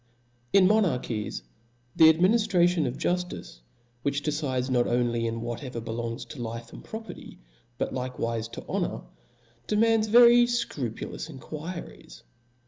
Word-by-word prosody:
In 195 Hz, -2 st, +6 dB
tnonarchies, 150 Hz, -, 0 dB, 0.6 s
theadminiftrationof 175 Hz, -, +4 dB
juftice, 175 Hz, -, -3 dB, 0.4 s
which 140 Hz, +2 st, -1 dB
decides 135 Hz, -4 st, -1 dB
pot 120 Hz, -1 st, +2 dB
oply 120 Hz, -1 st, +1 dB
in 115 Hz, 0 st, -3 dB
whatever 120 Hz, +1 st, -5 dB
belongs 115 Hz, +1 st, -4 dB
to 120 Hz, +2 st, -9 dB
life 115 Hz, 0 st, -6 dB
and -, -, -10 dB
pro 220 Hz, 0 st, -6 dB
perty, 225 Hz, -, -11 dB, 0.4 s
but -, -, -2 dB
likewife 115 Hz, -3 st, -3 dB
to -, -, -8 dB
honor, -, -, -2 dB, 0.7 s
demands 220 Hz, +1 st, +3 dB
very 240 Hz, +2 st, +7 dB
fcrupu* 235 Hz, -, -3 dB
lous -, -, -6 dB
enquiries. 155 Hz, -, -8 dB
140 Hz, 120 wpm, -27 LUFS, 115-185 Hz, 0.7 s, very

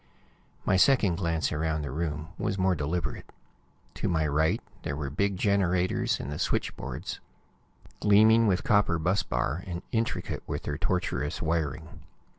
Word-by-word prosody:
My 95 Hz, -, +3 dB
second 100 Hz, -6 st, +4 dB
glance 85 Hz, -3 st, 0 dB
around 80 Hz, 0 st, -1 dB
the 70 Hz, -, -4 dB
room 75 Hz, +1 st, -3 dB
was 105 Hz, -2 st, -1 dB
more 95 Hz, 0 st, +3 dB
deliberate. 80 Hz, +1 st, -3 dB, 0.6 s
To -, -, -2 dB
my 80 Hz, -2 st, +1 dB
right 75 Hz, +2 st, +2 dB, 0.2 s
were 70 Hz, -1 st, -3 dB
the -, -, -11 dB
big 100 Hz, +1 st, +1 dB
generators 95 Hz, -2 st, +1 dB
and 70 Hz, -, -5 dB
the 75 Hz, -, -4 dB
switchboards, -, -, -3 dB, 0.8 s
gleaming 110 Hz, +2 st, +6 dB
with 95 Hz, -2 st, +2 dB
copper 100 Hz, -5 st, +3 dB
bus 90 Hz, +5 st, +1 dB
bar, 65 Hz, +8 st, -2 dB
and 85 Hz, -1 st, -5 dB
intricate 115 Hz, +1 st, -1 dB
with -, -, -3 dB
their -, -, -3 dB
tortuous 90 Hz, -5 st, -1 dB
wiring. 80 Hz, -3 st, -2 dB
85 Hz, 145 wpm, -28 LUFS, 75-100 Hz, 0.8 s, gleaming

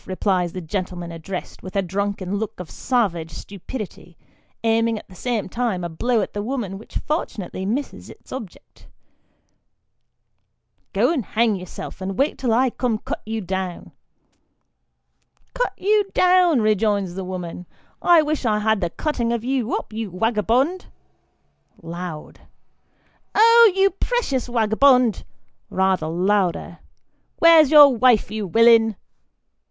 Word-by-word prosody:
" -, -, -28 dB
replies 185 Hz, -2 st, -1 dB
the 185 Hz, -, -5 dB
gentleman 175 Hz, 0 st, -5 dB
addressed, 170 Hz, +3 st, -7 dB
with 185 Hz, 0 st, -10 dB
a 195 Hz, -, +2 dB
drunken 200 Hz, +1 st, -3 dB
look 220 Hz, -1 st, -5 dB
of 180 Hz, -, -8 dB
savage 195 Hz, -11 st, -1 dB
stupidity, 195 Hz, +1 st, -9 dB, 0.5 s
aiming 225 Hz, 0 st, +1 dB
at -, -, -11 dB
the 190 Hz, -, -16 dB
same 230 Hz, +3 st, -3 dB
time 220 Hz, -3 st, -2 dB
a 170 Hz, -, -3 dB
blow 230 Hz, +8 st, 0 dB
at -, -, -5 dB
the 205 Hz, -, -3 dB
woman 210 Hz, -5 st, -4 dB
which 220 Hz, -, -8 dB
fortunately 205 Hz, -, -4 dB
misses 265 Hz, +7 st, -4 dB
its -, -, -16 dB
object. 260 Hz, +1 st, -10 dB, 2.0 s
"Go -, -, +2 dB
and 275 Hz, -8 st, -1 dB
hang 220 Hz, +1 st, +1 dB
yourself; 180 Hz, 0 st, -8 dB
and 190 Hz, 0 st, -4 dB
wait 280 Hz, +3 st, 0 dB
till 250 Hz, -3 st, 0 dB
I 250 Hz, +2 st, +2 dB
come 245 Hz, -1 st, -1 dB
and 215 Hz, -, -5 dB
cut -, -, -4 dB
you 225 Hz, 0 st, -3 dB
down." 190 Hz, -1 st, -5 dB, 0.8 s
" -, -, -46 dB
Cut -, -, -1 dB
you 410 Hz, +1 st, +1 dB
down," 360 Hz, -7 st, +4 dB
rejoins 210 Hz, -3 st, +1 dB
the 190 Hz, +1 st, -5 dB
woman, 180 Hz, -1 st, -6 dB, 0.2 s
" -, -, -38 dB, 0.2 s
I 315 Hz, -, +5 dB
wish 300 Hz, -1 st, -2 dB
I 215 Hz, -3 st, +1 dB
had 215 Hz, -1 st, +1 dB
the 175 Hz, -, 0 dB
cutting 235 Hz, -, -2 dB
of 235 Hz, -2 st, -2 dB
you 255 Hz, -2 st, -1 dB
up, -, -, -6 dB
you 220 Hz, -1 st, -4 dB
wagabond! 230 Hz, -, 0 dB, 0.9 s
(loud.) 170 Hz, -1 st, -8 dB, 1.0 s
Oh! 460 Hz, 0 st, +7 dB
you 390 Hz, 0 st, +3 dB
precious 360 Hz, -, -2 dB
wagabond! 240 Hz, 0 st, +3 dB, 0.4 s
(rather 190 Hz, -4 st, 0 dB
louder.) 180 Hz, 0 st, 0 dB, 0.6 s
Where's 330 Hz, -3 st, +6 dB
your 290 Hz, -3 st, +8 dB
wife, 235 Hz, -4 st, +3 dB
you 215 Hz, -2 st, -3 dB
willin 225 Hz, +1 st, +5 dB
220 Hz, 145 wpm, -22 LUFS, 185-255 Hz, 2.0 s, your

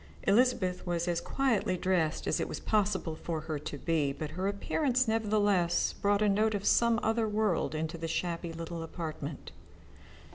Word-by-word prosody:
Elizabeth 200 Hz, -4 st, +2 dB
was 170 Hz, 0 st, -1 dB
as 170 Hz, -1 st, 0 dB
quietly 235 Hz, -9 st, 0 dB
dressed 175 Hz, -4 st, 0 dB
as -, -, 0 dB
it -, -, -1 dB
was -, -, -5 dB
possible 195 Hz, -6 st, 0 dB
for 160 Hz, 0 st, -4 dB
her 155 Hz, -1 st, -4 dB
to 150 Hz, 0 st, -6 dB
be, 150 Hz, -2 st, 0 dB
but 150 Hz, +2 st, -5 dB
her 185 Hz, +4 st, -2 dB
appearance 255 Hz, +5 st, +1 dB
nevertheless 205 Hz, -5 st, +2 dB
brought 205 Hz, +1 st, +1 dB
a -, -, +3 dB
note 210 Hz, +2 st, +2 dB
of 200 Hz, -, -3 dB
some 235 Hz, -1 st, +4 dB
other 225 Hz, 0 st, +1 dB
world 210 Hz, -6 st, 0 dB
into 160 Hz, +1 st, -3 dB
the 165 Hz, -, -3 dB
shabby 170 Hz, +1 st, -2 dB
little 165 Hz, 0 st, -6 dB
apartment. 160 Hz, -3 st, -6 dB
180 Hz, 170 wpm, -31 LUFS, 165-215 Hz, -, some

